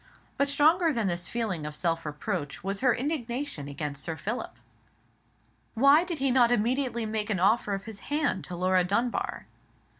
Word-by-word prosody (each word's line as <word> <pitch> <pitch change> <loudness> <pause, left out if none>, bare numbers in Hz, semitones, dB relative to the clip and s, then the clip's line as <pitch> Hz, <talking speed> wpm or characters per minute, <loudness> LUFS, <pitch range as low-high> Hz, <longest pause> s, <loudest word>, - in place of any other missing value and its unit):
But 280 - +2
stronger 315 +4 +4
than 230 -6 -1
this 175 -2 -1
feeling 215 -9 -2
of 150 0 -5
self 165 -1 -1
reproach 145 0 -4
was 195 +1 -2
her 255 -3 +3
indignation 255 - -3
against 145 0 -4
Sir 165 -2 -3
Philip. 225 +8 -4 1.2
Why 280 +7 +6
did 350 -2 -4
he 270 -1 +1
not 245 -2 +5
immediately 240 +1 0
make 215 -1 -2
an 200 -4 0
offer 205 +1 +2
of 195 - -7
his 220 -3 -7
hand 290 -6 -1
to 180 - -6
Laura 185 +1 +2
Dunbar? 230 +7 -1
220 Hz, 170 wpm, -28 LUFS, 180-265 Hz, 1.2 s, Why